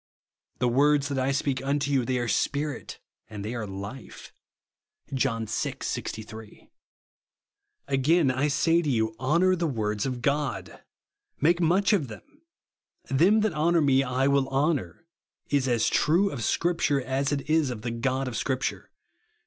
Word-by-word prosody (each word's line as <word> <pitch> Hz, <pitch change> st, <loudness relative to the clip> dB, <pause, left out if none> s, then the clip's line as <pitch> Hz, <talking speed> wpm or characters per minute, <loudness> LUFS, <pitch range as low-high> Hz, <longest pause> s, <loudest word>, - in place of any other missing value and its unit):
" -, -, -49 dB
The 125 Hz, -, +3 dB
words 140 Hz, +3 st, +3 dB
that 140 Hz, -2 st, -1 dB
I 130 Hz, +1 st, +1 dB
speak 135 Hz, -1 st, -1 dB
unto 140 Hz, 0 st, 0 dB
you, 130 Hz, -3 st, +2 dB
they 130 Hz, 0 st, 0 dB
are 120 Hz, -1 st, -2 dB
Spirit, 145 Hz, +7 st, -2 dB, 0.3 s
and 105 Hz, -2 st, -7 dB
they 110 Hz, -, -4 dB
are 115 Hz, -3 st, -4 dB
life," 100 Hz, +6 st, -9 dB, 0.8 s
(John 120 Hz, -4 st, 0 dB
vi. -, -, -9 dB, 0.2 s
6S), 110 Hz, 0 st, -7 dB, 1.2 s
Again 140 Hz, +2 st, +3 dB
I 130 Hz, +3 st, 0 dB
say 165 Hz, +4 st, +2 dB
to 155 Hz, -, -2 dB
you, 110 Hz, -3 st, 0 dB
honour 170 Hz, +8 st, +3 dB
the 170 Hz, -1 st, -1 dB
words 105 Hz, -4 st, -2 dB
of 125 Hz, -2 st, -5 dB
God. 145 Hz, 0 st, -2 dB, 0.6 s
Make 170 Hz, +4 st, +3 dB
much 185 Hz, +6 st, +3 dB
of 165 Hz, -10 st, +1 dB
them. 110 Hz, -2 st, -10 dB, 0.9 s
Them 185 Hz, +11 st, +4 dB
that 215 Hz, -4 st, 0 dB
honour 165 Hz, +2 st, +2 dB
me 135 Hz, -2 st, +4 dB
I 130 Hz, 0 st, 0 dB
will 140 Hz, -1 st, +2 dB
honour, 135 Hz, -, -1 dB, 0.5 s
is 140 Hz, -2 st, +2 dB
as 120 Hz, -3 st, +2 dB
true 180 Hz, +7 st, +2 dB
of 125 Hz, -5 st, -5 dB
Scripture 155 Hz, -3 st, +1 dB
as 135 Hz, +2 st, -1 dB
it 145 Hz, -1 st, -2 dB
is 155 Hz, -3 st, +2 dB
of 115 Hz, -4 st, -6 dB
the 120 Hz, -, -2 dB
God 130 Hz, +3 st, -1 dB
of 125 Hz, -, -5 dB
Scripture. 130 Hz, +4 st, -2 dB
135 Hz, 160 wpm, -26 LUFS, 125-150 Hz, 1.2 s, Them